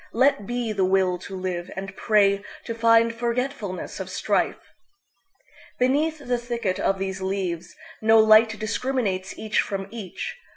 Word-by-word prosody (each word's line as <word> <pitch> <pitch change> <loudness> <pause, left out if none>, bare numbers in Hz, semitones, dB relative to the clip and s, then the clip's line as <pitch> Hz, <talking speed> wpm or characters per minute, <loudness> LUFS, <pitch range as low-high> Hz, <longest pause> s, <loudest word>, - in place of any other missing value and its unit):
Let 240 -4 +2
be 240 -2 -2
the 195 -2 +1
will 185 -1 +2
to 190 +1 -8
live, 185 -2 -4
and 195 0 -6
prayTo 205 +1 +1
find 230 0 +4
forgetfulness 235 -4 -3
of - - -5
strife. - - -1 1.0
Beneath 290 +5 +2
the 245 0 0
thicket 235 -5 -2
of 195 - +1
these 190 0 -4
leavesNo 190 +4 +1
light 215 0 +6
discriminates 215 -4 -2
each 215 -1 +1
from 195 -1 -4
each. 235 - -6
215 Hz, 130 wpm, -24 LUFS, 190-235 Hz, 1.0 s, light